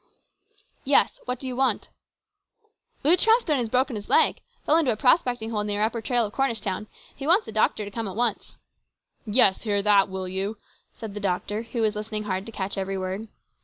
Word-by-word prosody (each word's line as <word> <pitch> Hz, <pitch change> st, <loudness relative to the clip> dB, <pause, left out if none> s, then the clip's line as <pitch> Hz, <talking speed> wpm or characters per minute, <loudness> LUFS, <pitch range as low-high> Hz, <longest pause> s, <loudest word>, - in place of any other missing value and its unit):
" -, -, -42 dB, 0.3 s
Yes; 275 Hz, +1 st, +3 dB
what 250 Hz, +1 st, -2 dB
do 265 Hz, -, -9 dB
you 255 Hz, -1 st, -3 dB
want? 265 Hz, 0 st, 0 dB, 0.4 s
" 420 Hz, +2 st, -55 dB
" 435 Hz, -, -43 dB
Lew 320 Hz, +5 st, +6 dB
Trethven 445 Hz, -, +3 dB
has 240 Hz, -3 st, -1 dB
broken 255 Hz, +1 st, +1 dB
his 205 Hz, -1 st, -7 dB
leg. 465 Hz, -, +3 dB, 0.2 s
Fell 310 Hz, -, +4 dB
into 300 Hz, -7 st, +2 dB
a -, -, -1 dB
prospecting 245 Hz, -2 st, +2 dB
hole 210 Hz, -2 st, -1 dB
near 205 Hz, 0 st, -1 dB
upper 230 Hz, +1 st, -1 dB
trail 240 Hz, 0 st, +1 dB
of 205 Hz, -, -7 dB
Cornish 270 Hz, -5 st, 0 dB
town. 200 Hz, +1 st, -4 dB, 0.3 s
He 275 Hz, -, -6 dB
wants 375 Hz, +7 st, +4 dB
the -, -, -8 dB
doctor 210 Hz, -, +1 dB
to 200 Hz, -, -8 dB
come 225 Hz, +1 st, -4 dB
at 190 Hz, -, -6 dB
once." 235 Hz, -2 st, -2 dB, 0.4 s
" -, -, -62 dB, 0.2 s
Yes; 210 Hz, -3 st, +4 dB
hear 205 Hz, -3 st, 0 dB
that, 205 Hz, -1 st, +4 dB
will 190 Hz, -1 st, -5 dB
you! 195 Hz, +4 st, -3 dB, 0.2 s
" -, -, -38 dB
said 220 Hz, -3 st, -7 dB
the 210 Hz, -, -5 dB
doctor, 205 Hz, +2 st, -2 dB
who 230 Hz, 0 st, -3 dB
was 215 Hz, -1 st, +1 dB
listening 215 Hz, 0 st, -4 dB
hard 190 Hz, -1 st, -3 dB
to -, -, -7 dB
catch 195 Hz, -1 st, -4 dB
every 195 Hz, 0 st, -3 dB
word. 190 Hz, +4 st, -4 dB
220 Hz, 225 wpm, -25 LUFS, 205-260 Hz, 0.4 s, Lew